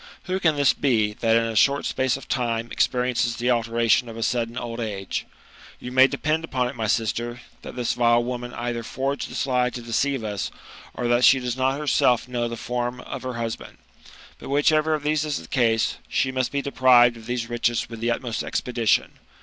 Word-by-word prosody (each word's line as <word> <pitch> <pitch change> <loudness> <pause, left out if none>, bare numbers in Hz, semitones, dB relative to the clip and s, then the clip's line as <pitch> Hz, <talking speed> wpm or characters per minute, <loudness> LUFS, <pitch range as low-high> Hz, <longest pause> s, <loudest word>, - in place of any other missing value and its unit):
Who 185 0 -2
can 160 -5 +2
this 140 -4 +4
be, 110 -7 +1
that 115 +1 +1
in 115 - +3
a 115 -1 -3
short 140 +6 +3
space 130 -1 0
of 135 - -12
thne 120 -2 -1
experiences 125 -1 +1
the 125 +2 0
alteration 115 0 +2
of 115 - -9
a 115 - -2
sudden 120 0 -1
old 120 -1 -5
age? 100 -4 -4 0.5
You 125 - -7
may 130 +1 +6
depend 155 +3 -1
upon 130 -6 -1
it, 125 - -6
jny 110 -2 -2
sister, 120 +1 -1 0.2
that - - -9
this 125 -2 -1
vile 120 -1 +3
woman 120 0 -4
either 120 0 -3
forged 135 +4 -3
this - - -2
lie 125 -2 +1
to 125 - -7
deceive 125 +2 -1
us, 105 -2 -3 0.5
or 120 - -2
that 120 +1 +2
she 135 - +7
does 125 -1 -3
not 130 +1 0
herself 125 -5 +2
know 120 -1 -2
the 115 0 -5
form 120 +1 -3
of - - -7
her 130 -1 -5
husband. 115 -1 -5 0.6
But - - -9
whichever 155 +2 +3
of 150 - -6
these 150 0 +1
is 150 -2 -2
the 80 - -9
case, 115 -1 +1
she 130 - 0
must 130 -1 -1
be 140 -1 -1
deprived 125 -3 +5
of 115 -1 -12
these 120 -2 -2
riches 120 0 0
with 115 -1 -9
the 115 +1 -1
utmost 120 -1 -2
expedition. 120 -3 0
120 Hz, 205 wpm, -24 LUFS, 115-130 Hz, 0.6 s, she